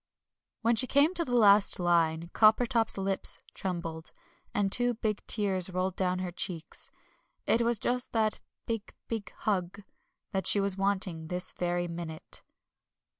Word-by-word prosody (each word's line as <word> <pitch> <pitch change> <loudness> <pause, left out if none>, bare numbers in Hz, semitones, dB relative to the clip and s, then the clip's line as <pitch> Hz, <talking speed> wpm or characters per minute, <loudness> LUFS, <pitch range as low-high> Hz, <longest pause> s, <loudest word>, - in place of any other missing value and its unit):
When 230 +1 +3
she 255 +3 +3
came 285 +7 +4
to 345 -2 0
the 245 -5 -2
last 205 -3 +5
line 170 -1 +1
Coppertop's 225 +1 +3
lips 195 0 0
trembled, 170 -3 -4 0.4
and 200 -1 0
two 245 +1 +1
big 215 -2 -2
tears 190 -4 0
rolled 185 0 -2
down 185 -1 0
her 185 -1 -4
cheeks. 170 -3 -3 0.6
It 230 - +3
was 235 0 +3
just 245 +4 -1
that 220 -2 +1 0.3
"Big, 225 -2 -5
big 225 -3 -4
hug" 190 -1 -1 0.5
that 190 -1 -1
she 205 - +6
was 200 -1 +4
wanting 190 -5 -1
this 180 +2 -1
very 175 0 -2
minute. 165 -2 -7
195 Hz, 145 wpm, -29 LUFS, 175-225 Hz, 0.6 s, she